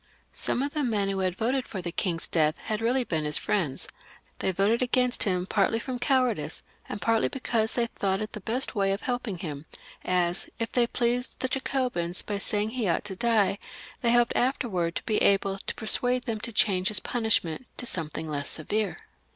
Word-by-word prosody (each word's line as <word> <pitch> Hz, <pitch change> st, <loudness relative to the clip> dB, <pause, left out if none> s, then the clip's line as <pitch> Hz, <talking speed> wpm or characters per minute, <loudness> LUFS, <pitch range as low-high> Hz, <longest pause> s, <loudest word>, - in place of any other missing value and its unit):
Some 255 Hz, -, -1 dB
of 285 Hz, -, -3 dB
the 300 Hz, -, 0 dB
men 210 Hz, -7 st, +1 dB
who 190 Hz, -1 st, +1 dB
voted 245 Hz, +8 st, -1 dB
for 195 Hz, -, -5 dB
the 175 Hz, -1 st, -3 dB
king's 170 Hz, -2 st, -1 dB
death 155 Hz, -2 st, +2 dB
had 215 Hz, 0 st, -2 dB
really 250 Hz, +3 st, +2 dB
been 160 Hz, -9 st, -1 dB
his 150 Hz, 0 st, +4 dB
friends; 160 Hz, -10 st, -1 dB, 0.5 s
they -, -, -2 dB
had 190 Hz, -, 0 dB
voted 210 Hz, +6 st, +3 dB
against 250 Hz, 0 st, +2 dB
him 180 Hz, -3 st, +1 dB
partly 210 Hz, +3 st, +2 dB
from 250 Hz, +2 st, -4 dB
cowardice 245 Hz, -, +1 dB, 0.3 s
and 205 Hz, -, -4 dB
partly 225 Hz, +1 st, +2 dB
because 230 Hz, -4 st, -1 dB
they 240 Hz, -, +2 dB
thought 195 Hz, -4 st, -1 dB
it 215 Hz, +1 st, -4 dB
the 215 Hz, -, -6 dB
best 240 Hz, +7 st, -1 dB
way 195 Hz, -3 st, +2 dB
of 200 Hz, -, -4 dB
helping 245 Hz, -6 st, -2 dB
him, 150 Hz, -3 st, -6 dB, 0.4 s
as, 180 Hz, 0 st, +1 dB
if 230 Hz, -, -3 dB
they 240 Hz, -1 st, +3 dB
pleased 245 Hz, +1 st, 0 dB
the 260 Hz, -, +1 dB
Jacobins 250 Hz, -10 st, 0 dB
by 205 Hz, -1 st, -3 dB
saying 210 Hz, +2 st, -1 dB
he 235 Hz, -4 st, -1 dB
ought 175 Hz, -, +1 dB
to 195 Hz, -2 st, -4 dB
die, 215 Hz, -2 st, +2 dB, 0.4 s
they 235 Hz, -, +3 dB
hoped 240 Hz, 0 st, +4 dB
afterwards 210 Hz, -10 st, 0 dB
to -, -, -3 dB
be 215 Hz, -, +1 dB
able 195 Hz, 0 st, +3 dB
to -, -, -4 dB
persuade 245 Hz, +2 st, +1 dB
them 225 Hz, -4 st, -2 dB
to 235 Hz, -, -4 dB
ch^eLpunishment 210 Hz, 0 st, +1 dB
to -, -, 0 dB
something 160 Hz, -6 st, -2 dB
less 145 Hz, -2 st, -2 dB
severe. 205 Hz, +7 st, -1 dB
215 Hz, 190 wpm, -27 LUFS, 185-245 Hz, 0.5 s, his